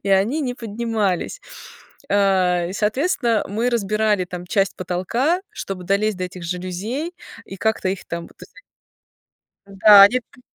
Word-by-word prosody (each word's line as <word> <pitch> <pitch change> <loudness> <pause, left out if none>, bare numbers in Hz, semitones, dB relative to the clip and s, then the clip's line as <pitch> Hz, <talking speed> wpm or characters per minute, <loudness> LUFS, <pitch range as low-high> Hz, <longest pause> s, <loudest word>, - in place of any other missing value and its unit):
и 200 - -4
они 205 +11 +2
не 250 -4 -2
поднимались. 225 - -2 0.7
А, 185 -3 +2
и, 185 - -6
соответственно, 235 - 0
мы 230 +5 -1
разбирали 215 -3 +1
там 180 0 -8
часть 195 +2 0
потолка, 210 - -1
чтобы 185 -2 -6
долезть 200 +2 0
до 185 - -2
этих 180 0 -8
жалюзей 185 - -4 0.3
и 195 - -9
как-то 220 -1 0
их 190 - -5
там 170 0 -5
вот. - - -23 1.3
Да. 200 +1 +8
Не 250 +3 -1
подни 245 - -23
200 Hz, 140 wpm, -21 LUFS, 185-230 Hz, 1.3 s, Да